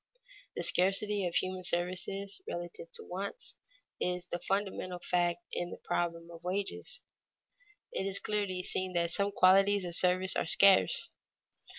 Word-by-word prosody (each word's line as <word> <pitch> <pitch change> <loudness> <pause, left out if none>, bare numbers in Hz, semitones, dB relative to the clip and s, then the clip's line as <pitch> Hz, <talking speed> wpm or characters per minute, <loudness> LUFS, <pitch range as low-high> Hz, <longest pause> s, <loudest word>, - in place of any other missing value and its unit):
The - - -3
scarcity 195 +1 +1
of 170 - -5
human 185 0 -1
services, 185 - -1
relative 175 -1 -6
to - - -3
wants, 200 - -5 0.4
is 180 0 -1
the 175 -1 -4
fundamental 190 -1 -2
fact 175 +2 0
in 175 - -2
the - - -8
problem 170 -1 -3
of 165 0 -12
wages. 195 +3 -2 0.9
It 190 - -2
is 195 0 -1
clearly 200 -3 -1
seen 185 0 -1
that 170 -1 +1
some 200 +3 +2
qualities 195 +1 +5
of 175 - -4
service 185 +2 +4
are - - 0
scarce. 190 - +5
185 Hz, 145 wpm, -32 LUFS, 175-195 Hz, 0.9 s, qualities